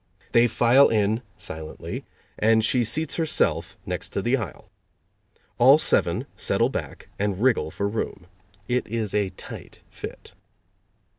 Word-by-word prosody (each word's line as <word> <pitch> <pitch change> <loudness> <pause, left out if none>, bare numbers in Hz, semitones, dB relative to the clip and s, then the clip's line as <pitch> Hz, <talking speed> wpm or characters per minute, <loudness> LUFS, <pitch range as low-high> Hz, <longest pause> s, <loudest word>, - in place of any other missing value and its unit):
They 120 +1 +5
file 125 +4 +5
in 110 +1 +1 0.2
silently 80 0 -7 0.3
and 110 0 +4
she 125 +1 +3
seats 155 +8 -2
herself 160 -2 0
next - - -5
the 120 +3 +3
aisle. 105 -8 -6 0.9
All 135 +4 +8
seven - - +2
settle - - +1
back - - -6
and 100 -2 -1
wriggle 115 -10 +2
for 100 +5 -2
room. 100 -4 -4 0.4
It 125 -1 0
is 110 -2 -2
a 105 -2 +1
tight - - -10
fit. - - -9
115 Hz, 130 wpm, -25 LUFS, 105-125 Hz, 0.9 s, All